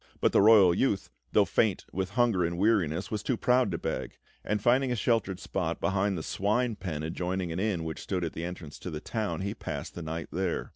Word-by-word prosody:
But -, -, +3 dB
the -, -, +5 dB
royal 100 Hz, -4 st, +7 dB
youth, 100 Hz, -, 0 dB, 0.2 s
though -, -, +5 dB
faint -, -, +1 dB
with 95 Hz, 0 st, -1 dB
hunger 115 Hz, -7 st, +3 dB
and 85 Hz, 0 st, -1 dB
weariness, 95 Hz, -4 st, +1 dB
was 105 Hz, -2 st, -2 dB
too 120 Hz, +2 st, -1 dB
proud 125 Hz, -1 st, +3 dB
to 85 Hz, -, -2 dB
beg; -, -, -4 dB, 0.3 s
and 105 Hz, 0 st, 0 dB
finding 125 Hz, +4 st, +3 dB
a -, -, +1 dB
sheltered 105 Hz, -5 st, 0 dB
spot -, -, -2 dB
behind 95 Hz, 0 st, +1 dB
the 80 Hz, -, -4 dB
swine 110 Hz, +7 st, 0 dB
pen 85 Hz, -6 st, -4 dB
adjoining 90 Hz, +2 st, -2 dB
an 85 Hz, -, -3 dB
inn 95 Hz, -5 st, 0 dB
which 80 Hz, -1 st, -5 dB
stood 90 Hz, -3 st, -2 dB
at 80 Hz, -, -3 dB
the 80 Hz, -, -5 dB
entrance 85 Hz, -4 st, -7 dB
to -, -, -6 dB
the 75 Hz, -3 st, -5 dB
town, 100 Hz, -3 st, -3 dB
he 100 Hz, +1 st, -2 dB
passed -, -, -6 dB
the 85 Hz, -, -7 dB
night 80 Hz, +1 st, -5 dB
there. 90 Hz, -1 st, -2 dB
95 Hz, 225 wpm, -29 LUFS, 85-110 Hz, 0.3 s, royal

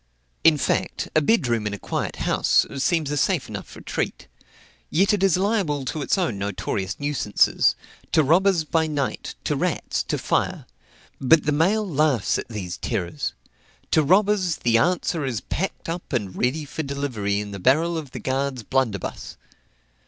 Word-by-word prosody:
In 160 Hz, -2 st, +6 dB
fact, -, -, -1 dB
a 155 Hz, -, +5 dB
bed 195 Hz, -, +3 dB
room 115 Hz, -3 st, 0 dB
in 105 Hz, -, -3 dB
a -, -, -8 dB
quiet -, -, -3 dB
house, -, -, +2 dB
seems 150 Hz, +1 st, +1 dB
a 145 Hz, -, -1 dB
safe -, -, +1 dB
enough -, -, -8 dB
retreat; -, -, -4 dB, 0.6 s
yet 195 Hz, +7 st, +3 dB
it 205 Hz, -, 0 dB
is 195 Hz, -3 st, +4 dB
liable 185 Hz, -9 st, 0 dB
to 150 Hz, +4 st, -3 dB
its 140 Hz, -, +1 dB
own 165 Hz, -, -1 dB
notorious 95 Hz, -1 st, -3 dB
nuisances, 145 Hz, -8 st, +2 dB, 0.4 s
to 155 Hz, -, +4 dB
robbers 175 Hz, +3 st, +3 dB
by 160 Hz, +1 st, +1 dB
night, 145 Hz, -3 st, -3 dB
to -, -, 0 dB
rats, -, -, -1 dB
to -, -, -1 dB
fire. -, -, -1 dB, 0.5 s
But 150 Hz, +4 st, +5 dB
the 150 Hz, -, +2 dB
mail 195 Hz, +8 st, +2 dB
laughs 150 Hz, -, +1 dB
at -, -, -7 dB
these 95 Hz, -6 st, -5 dB
terrors. 85 Hz, -4 st, -3 dB, 0.6 s
To 155 Hz, -, +5 dB
robbers, 190 Hz, +2 st, +3 dB
the 115 Hz, -1 st, +2 dB
answer 175 Hz, 0 st, +1 dB
is 125 Hz, -5 st, -2 dB
packed 190 Hz, -, -4 dB
up 170 Hz, -2 st, -5 dB
and 100 Hz, -7 st, -2 dB
ready 145 Hz, +5 st, 0 dB
for 150 Hz, -, -4 dB
delivery 135 Hz, -9 st, -2 dB
in 105 Hz, 0 st, -5 dB
the 100 Hz, -, -6 dB
barrel 160 Hz, -, +3 dB
of 155 Hz, -4 st, -4 dB
the -, -, -7 dB
guard's 135 Hz, -2 st, -2 dB
blunderbuss. 115 Hz, -5 st, -2 dB
145 Hz, 165 wpm, -24 LUFS, 120-170 Hz, 0.6 s, In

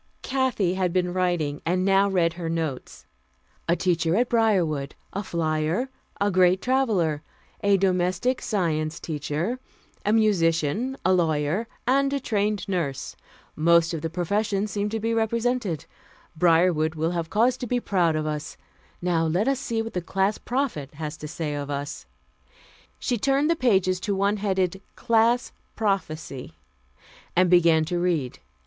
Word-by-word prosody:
Kathy 260 Hz, -9 st, 0 dB
had 185 Hz, -2 st, 0 dB
been 180 Hz, 0 st, 0 dB
writing, 175 Hz, -6 st, 0 dB
and 180 Hz, +2 st, 0 dB
now 195 Hz, +1 st, +4 dB
read 170 Hz, -4 st, +2 dB
her 170 Hz, -1 st, -5 dB
notes: 135 Hz, -, -4 dB, 0.6 s
"A 170 Hz, -, +4 dB
teacher 170 Hz, -2 st, +1 dB
at 240 Hz, +3 st, +2 dB
Briarwood; 180 Hz, -12 st, +1 dB, 0.2 s
a 200 Hz, -, -2 dB
flyer; 165 Hz, +5 st, -1 dB, 0.3 s
a 205 Hz, 0 st, +2 dB
great 185 Hz, 0 st, +4 dB
traveler; 205 Hz, -, +1 dB, 0.4 s
a 200 Hz, -1 st, +4 dB
Domestic 185 Hz, +6 st, +1 dB
Science 160 Hz, -6 st, -1 dB
teacher; 155 Hz, -, -3 dB, 0.4 s
a 210 Hz, -, +1 dB
musician; 210 Hz, -, +2 dB
a 185 Hz, -, +4 dB
lawyer; 165 Hz, +4 st, +1 dB, 0.2 s
and 275 Hz, +2 st, +3 dB
a 280 Hz, -, 0 dB
trained 210 Hz, -5 st, -1 dB
nurse. 165 Hz, -9 st, -2 dB, 0.4 s
Most 170 Hz, +1 st, +4 dB
of 160 Hz, -, -3 dB
the 165 Hz, -, -2 dB
professions 200 Hz, +4 st, -1 dB
seemed 205 Hz, 0 st, -1 dB
to 225 Hz, +1 st, -2 dB
be 225 Hz, +2 st, -1 dB
represented. 230 Hz, -, 0 dB, 0.5 s
Briarwood 165 Hz, -1 st, +3 dB
will 160 Hz, +2 st, 0 dB
have 170 Hz, -2 st, -3 dB
cause 240 Hz, +4 st, +3 dB
to 250 Hz, -, -5 dB
be 245 Hz, +1 st, +1 dB
proud 175 Hz, -8 st, +1 dB
of 155 Hz, 0 st, -1 dB
us. 150 Hz, 0 st, -4 dB, 0.5 s
Now 165 Hz, -2 st, +1 dB
let 180 Hz, +9 st, +1 dB
us 275 Hz, -1 st, +1 dB
see 225 Hz, -3 st, -2 dB
what 225 Hz, -, -7 dB
the 180 Hz, -, -1 dB
Class 195 Hz, +4 st, 0 dB
Prophet 235 Hz, -, -2 dB
has 155 Hz, 0 st, -5 dB
to 150 Hz, -, -7 dB
say 155 Hz, -1 st, -4 dB
of 145 Hz, -1 st, -4 dB
us." 145 Hz, -, -5 dB, 0.9 s
She 245 Hz, -3 st, -1 dB
turned 275 Hz, +6 st, +2 dB
the -, -, +3 dB
pages 190 Hz, -, +2 dB
to 200 Hz, +2 st, -1 dB
one 200 Hz, +2 st, +1 dB
headed 190 Hz, -2 st, 0 dB
CLASS 235 Hz, +1 st, +2 dB, 0.2 s
PROPHECY 155 Hz, -, -2 dB, 0.8 s
and 180 Hz, 0 st, +4 dB
began 165 Hz, -3 st, +5 dB
to 175 Hz, +2 st, -2 dB
read. 165 Hz, -8 st, -1 dB
180 Hz, 155 wpm, -25 LUFS, 160-215 Hz, 0.9 s, began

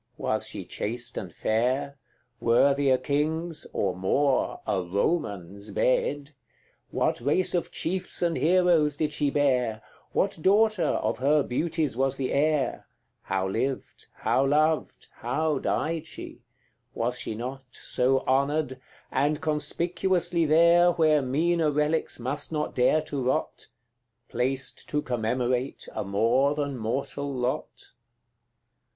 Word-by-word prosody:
Was -, -, -1 dB
she -, -, -6 dB
chaste 120 Hz, +2 st, -4 dB
and 90 Hz, -, -5 dB
fair? 125 Hz, +9 st, 0 dB, 0.4 s
Worthy 140 Hz, +4 st, +3 dB
a 130 Hz, -, +5 dB
king's 150 Hz, +4 st, -1 dB
or 95 Hz, -3 st, -1 dB
more 130 Hz, +9 st, +1 dB
a 95 Hz, -, 0 dB
Roman's 100 Hz, -, -2 dB
bed? 140 Hz, +6 st, 0 dB, 0.6 s
What -, -, 0 dB
race 150 Hz, +9 st, +1 dB
of 175 Hz, -, 0 dB
chiefs 180 Hz, +1 st, -1 dB
and 170 Hz, -1 st, +1 dB
heroes 160 Hz, -1 st, +3 dB
did 150 Hz, -1 st, -1 dB
she 145 Hz, -1 st, +1 dB
bear? 125 Hz, -6 st, +1 dB, 0.3 s
What 195 Hz, -3 st, 0 dB
daughter 210 Hz, +1 st, +3 dB
of -, -, -1 dB
her 145 Hz, +2 st, +3 dB
beauties 155 Hz, +2 st, -1 dB
was 135 Hz, +1 st, 0 dB
the 130 Hz, -2 st, -2 dB
heir? 150 Hz, -1 st, 0 dB, 0.3 s
How 95 Hz, -1 st, -1 dB
lived 130 Hz, +7 st, -3 dB
how 130 Hz, -, +1 dB
loved 155 Hz, +2 st, +1 dB
how 150 Hz, +5 st, -1 dB
died 160 Hz, 0 st, -1 dB
she? -, -, -9 dB, 0.5 s
Was 120 Hz, +2 st, -1 dB
she 110 Hz, -, -4 dB
not 130 Hz, +4 st, -6 dB
So 130 Hz, +1 st, 0 dB
honoured 135 Hz, 0 st, 0 dB, 0.3 s
and 145 Hz, +3 st, +1 dB
conspicuously 170 Hz, +3 st, 0 dB
there, 170 Hz, +3 st, +5 dB
Where 155 Hz, -3 st, +3 dB
meaner 160 Hz, +5 st, +1 dB
relics 150 Hz, +1 st, 0 dB
must 140 Hz, +6 st, -2 dB
not 150 Hz, -1 st, -2 dB
dare 140 Hz, +5 st, +3 dB
to 140 Hz, -3 st, -4 dB
rot, 130 Hz, -, -2 dB, 0.6 s
Placed 130 Hz, +2 st, -2 dB
to 150 Hz, 0 st, -1 dB
commemorate 125 Hz, +2 st, -1 dB
a -, -, -3 dB
more 115 Hz, +8 st, +2 dB
than 145 Hz, -2 st, -2 dB
mortal 135 Hz, +5 st, -3 dB
lot? 125 Hz, -1 st, -4 dB
140 Hz, 125 wpm, -27 LUFS, 125-155 Hz, 0.6 s, a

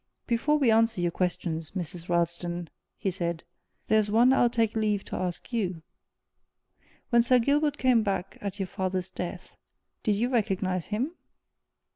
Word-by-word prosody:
"Before 265 Hz, +6 st, +2 dB
we 265 Hz, -6 st, +3 dB
answer 225 Hz, -2 st, +3 dB
your 175 Hz, -1 st, +1 dB
questions, 165 Hz, -3 st, -2 dB
Mrs. 175 Hz, -1 st, -5 dB
Ralston," 170 Hz, 0 st, -1 dB, 0.3 s
he 195 Hz, -2 st, -1 dB
said, 170 Hz, -2 st, -3 dB, 0.4 s
"there's 215 Hz, -1 st, +3 dB
one 235 Hz, +5 st, +5 dB
I'll 245 Hz, -2 st, +4 dB
take 225 Hz, -2 st, 0 dB
leave 210 Hz, -2 st, 0 dB
to -, -, -6 dB
ask 180 Hz, +6 st, -4 dB
you. 185 Hz, -8 st, -1 dB, 1.3 s
When 235 Hz, 0 st, +6 dB
Sir 250 Hz, +2 st, +4 dB
Gilbert 290 Hz, +4 st, +2 dB
came 255 Hz, -4 st, +4 dB
back 195 Hz, -3 st, -2 dB
at 200 Hz, -1 st, -4 dB
your 195 Hz, -, 0 dB
father's 185 Hz, -1 st, -2 dB
death, 180 Hz, 0 st, -6 dB, 0.5 s
did 215 Hz, -, +2 dB
you 230 Hz, +5 st, 0 dB
recognize 195 Hz, -7 st, 0 dB
him?" 235 Hz, +9 st, -1 dB
200 Hz, 150 wpm, -28 LUFS, 180-235 Hz, 1.3 s, When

